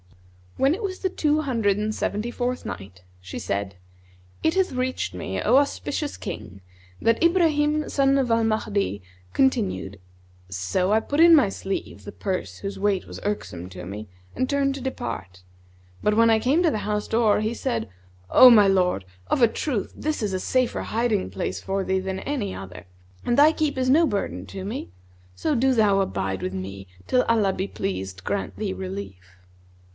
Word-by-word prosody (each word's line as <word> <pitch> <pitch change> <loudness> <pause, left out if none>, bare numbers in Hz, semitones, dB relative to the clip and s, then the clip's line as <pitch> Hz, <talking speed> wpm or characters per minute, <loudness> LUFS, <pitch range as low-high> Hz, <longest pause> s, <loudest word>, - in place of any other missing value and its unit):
When 270 +3 +3
it 395 - -4
was 375 -2 -3
the 375 - 0
Two 305 -4 +1
Hundred 225 -8 +1
and 215 +1 -1
Seventy 215 +3 -2
fourth 250 +1 -2
Night, 95 -2 -8 0.2
She 90 0 -7
said, 100 0 -3 0.7
It 320 - +2
hath 380 -1 +2
reached 255 0 -2
me, 95 +1 -4
O 240 +5 +4
auspicious 285 +1 -1
King, 100 -2 -7 0.4
that 230 0 +2
Ibrahim 305 -3 +3
son 275 0 +3
of 260 -3 +1
Al 230 0 +3
Mahdi 210 - 0 0.3
continued, 205 - 0 0.5
"So 95 - -1
I 215 - +5
put 285 +6 -3
in 335 0 +9
my 265 -10 +4
sleeve 195 0 -5
the 205 - -8
purse 185 - -4
whose 195 0 -6
weight 200 -1 +1
was - - -8
irksome 95 - -4
to 90 -1 -9
me; 105 +3 -7 0.3
and 260 - -1
turned 275 -1 +1
to 275 - -7
depart, 95 - -5 0.6
but 210 0 +2
when 230 0 +6
I 220 - +4
came 280 +10 +2
to 330 - +3
the 215 - -1
house 210 0 -2
door 225 -2 +3
he 220 +2 -1
said, 115 - -2 0.4
'O 255 - +9
my 210 -4 +7
lord, 180 - +2 0.2
of - - +1
a 235 - +8
truth 225 -1 -3
this 310 -3 -2
is 200 -2 -1
a 185 - -1
safer 255 +5 0
hiding 225 - 0
place 95 -1 -4
for 195 0 -2
thee 190 0 0
than 190 0 -3
any 245 -10 -3
other, 95 0 -9 0.4
and 240 - +1
thy 295 +2 +7
keep 305 -3 -1
is 255 0 +1
no 320 +5 +5
burden 95 - -3
to 95 0 -7
me; 85 - -5 0.5
so 310 - 0
do 265 +2 +3
thou 210 -4 +4
abide 95 - -2
with 95 - -3
me, 95 +1 -6 0.2
till 250 - +3
Allah 215 -4 +2
be 190 +1 -3
pleased 95 - -4
grant - - -3
thee - - -2
relief.' 95 -1 -7
210 Hz, 185 wpm, -24 LUFS, -, 0.7 s, in